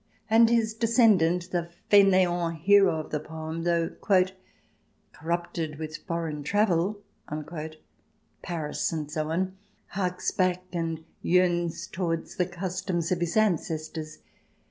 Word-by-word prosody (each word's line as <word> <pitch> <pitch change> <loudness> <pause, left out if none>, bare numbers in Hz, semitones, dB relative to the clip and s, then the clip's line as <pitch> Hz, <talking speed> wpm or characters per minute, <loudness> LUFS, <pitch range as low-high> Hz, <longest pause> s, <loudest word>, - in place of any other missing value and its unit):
And 225 +1 +6
his 225 -2 +2
descendant, 210 -7 +3
the 170 -1 -1 0.2
faineant 180 -5 +4
hero 195 -1 +5
of 155 - -7
the 150 - 0
poem, 160 +1 -6
though 170 -1 +2
" 185 -1 -3
corrupted 165 -1 -3
with 155 0 -5
foreign 165 -3 -3
travel," 200 +3 +1 1.4
Paris 160 -4 -2
and 155 -3 -4
so 155 0 -2
on, 185 +3 -1 0.3
harks 180 -1 -1
back 185 -1 +1
and 165 -2 -2 0.2
yearns 175 -2 +1
towards 165 -3 -3
the 180 - +1
customs 180 -1 -3
of 180 - +1
his 175 +3 -1
ancestors. 160 -6 -1
175 Hz, 120 wpm, -27 LUFS, 165-190 Hz, 1.4 s, And